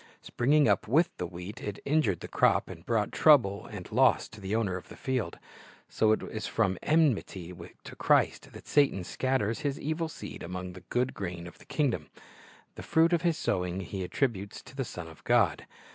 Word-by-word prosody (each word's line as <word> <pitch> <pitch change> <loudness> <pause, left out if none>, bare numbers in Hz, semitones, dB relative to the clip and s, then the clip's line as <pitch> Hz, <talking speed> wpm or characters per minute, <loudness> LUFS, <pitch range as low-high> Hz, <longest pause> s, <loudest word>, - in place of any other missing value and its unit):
Springing 145 +3 +3
up 105 0 +2
with 155 +9 +3
the 90 - -3
wheat, 90 +6 -8
it 105 -1 -4
injured 140 - +1
the - - -6
crop, - - +2
and 85 - -12
brought 110 -3 +1
trouble 120 -11 +4
and 100 -5 -9
loss 130 +1 +4
to 105 - -13
the 95 +3 -2
owner 105 -5 0
of 90 - -8
the - - -10
field. 130 -5 -2 0.5
So 110 - +2
it 110 - +1
is 110 0 -5
from 95 -5 0
enmity 115 - +1 0.3
to - - -10
Christ - - +2
that - - -11
Satan 140 -10 +2
scatters 115 +1 -1
his 140 -1 -2
evil 160 +2 -2
seed - - -8
among 90 0 -6
the 90 - -11
good 125 +1 0
grain 85 -3 -5
of 85 - -12
the - - -16
kingdom. 115 - -1 0.6
The - - -9
fruit 165 +2 +3
of 170 - +2
his 170 -2 +1
sowing 90 - -1
he 95 0 -5
attributes 100 -1 -2
to 130 - -14
the. 135 -2 -2
Son 90 -6 -7
of 80 -1 -14
God. 105 -11 +2
110 Hz, 195 wpm, -29 LUFS, 90-135 Hz, 0.6 s, trouble